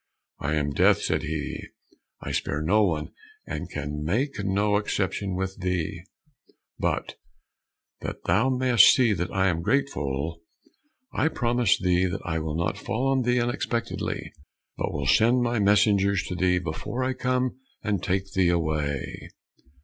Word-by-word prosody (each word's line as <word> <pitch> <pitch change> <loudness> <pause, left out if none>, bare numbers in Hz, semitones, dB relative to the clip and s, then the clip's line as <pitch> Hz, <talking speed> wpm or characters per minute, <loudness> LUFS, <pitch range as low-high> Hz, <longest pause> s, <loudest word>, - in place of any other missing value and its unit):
"I 75 +1 -1
am 70 -2 0
Death," - - +4
said - - 0
he. 80 -1 -4 0.6
"I - - -4
spare 75 +2 -1
no 105 +7 +4
one, 80 -6 -1 0.3
and - - -5
can 75 0 -4
make 110 - -1
no 100 +1 +2
exception 100 -2 -1
with 95 +1 -3
thee, 90 0 -2 0.8
but - - -2 0.8
that - - -6
thou 125 +5 +2
mayst 125 -4 +6
see 120 -5 +3
that 90 0 -2
I 95 0 +2
am 85 -3 0
grateful, 80 - -1 0.7
I - - +2
promise 120 -5 +2
thee 90 0 +2
that 95 +2 -4
I 80 -1 -1
will 80 0 -3
not 85 - -1
fall 130 +4 -1
on 135 -1 +2
thee 125 0 +2
unexpectedly, 120 -1 -2 0.4
but - - -2
will 70 -1 -3
send 120 - +4
my 120 -1 0
messengers 100 -1 +3
to 90 - -5
thee 90 0 +2
before 90 +9 -3
I 130 +1 0
come 130 0 -1 0.2
and 105 -4 0
take 95 0 -1
thee 95 -2 +3
away." 75 -5 -2
95 Hz, 150 wpm, -26 LUFS, 80-120 Hz, 0.8 s, mayst